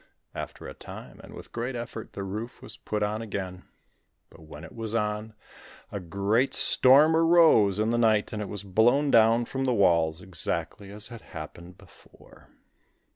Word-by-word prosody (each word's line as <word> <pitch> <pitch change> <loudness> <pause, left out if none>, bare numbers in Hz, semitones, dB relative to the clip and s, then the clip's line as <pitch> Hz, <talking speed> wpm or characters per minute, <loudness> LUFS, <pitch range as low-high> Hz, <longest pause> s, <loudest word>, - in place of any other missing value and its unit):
After - - -7
a - - -8
time, - - -11
and - - -12
with - - -12
great 120 +2 -4
effort, 115 -1 -7
the 100 - -5
roof 105 +5 -6
was - - -8
put 105 -1 -3
on 105 +2 -2
again. 95 -4 -6 0.7
But 85 - -17
when 75 -1 -12
it - - -11
was 115 -1 -5
on, 105 0 -2 0.6
a 100 - -4
great 100 +8 0
storm 145 +5 +5
arose 165 - +5
in 110 +2 0
the 120 - +1
night 110 -3 +2
and 105 - -3
it 105 - -5
was 105 -1 -5
blown 120 +9 +2
down 115 +1 +4
from 135 +2 -3
the 125 -2 +1
walls, 85 -5 +2
exactly 95 +2 -2
as 105 +3 -6
had 115 -2 -10
happened 85 +3 -10
before. - - -20
110 Hz, 175 wpm, -27 LUFS, 95-120 Hz, 0.7 s, storm